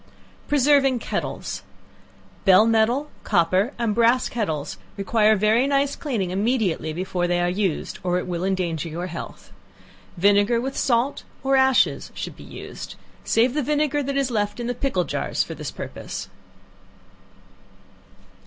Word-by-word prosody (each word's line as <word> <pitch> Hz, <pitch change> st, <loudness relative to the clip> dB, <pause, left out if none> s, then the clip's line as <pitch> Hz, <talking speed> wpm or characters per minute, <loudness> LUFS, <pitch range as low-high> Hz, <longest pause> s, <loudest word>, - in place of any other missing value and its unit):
Preserving 280 Hz, -2 st, +4 dB
Kettles. -, -, -4 dB, 0.8 s
Bell 195 Hz, +2 st, +6 dB
metal, 230 Hz, +6 st, +2 dB
copper 185 Hz, +4 st, +2 dB
and 230 Hz, -3 st, 0 dB
brass 235 Hz, +3 st, +3 dB
kettles 160 Hz, -11 st, -3 dB, 0.2 s
require 215 Hz, +2 st, +3 dB
very 215 Hz, +6 st, +3 dB
nice 280 Hz, 0 st, +1 dB
cleaning 215 Hz, -11 st, -2 dB
immediately 200 Hz, -5 st, 0 dB
before 180 Hz, +1 st, -2 dB
they 175 Hz, 0 st, +1 dB
are 175 Hz, -, +1 dB
used, 190 Hz, -3 st, -2 dB
or 180 Hz, -1 st, 0 dB
it 180 Hz, -, -2 dB
will 175 Hz, -1 st, -3 dB
endanger 175 Hz, -4 st, -1 dB
your 170 Hz, +3 st, -4 dB
health. 175 Hz, -2 st, -8 dB, 0.7 s
Vinegar 205 Hz, +5 st, +4 dB
with 270 Hz, +3 st, -3 dB
salt 245 Hz, +2 st, +1 dB, 0.2 s
or 270 Hz, 0 st, +3 dB
ashes 265 Hz, -1 st, +3 dB
should -, -, -5 dB
be -, -, -13 dB
used; -, -, -9 dB, 0.3 s
save 240 Hz, +2 st, +2 dB
the 300 Hz, -, 0 dB
vinegar 295 Hz, +1 st, +1 dB
that 275 Hz, 0 st, -2 dB
is 270 Hz, -2 st, 0 dB
left 205 Hz, 0 st, -1 dB
in 240 Hz, -, -3 dB
the 245 Hz, -, -1 dB
pickle 245 Hz, -7 st, 0 dB
jars -, -, -1 dB
for -, -, -7 dB
this -, -, -6 dB
purpose. -, -, -7 dB
220 Hz, 145 wpm, -23 LUFS, 185-265 Hz, 0.8 s, Bell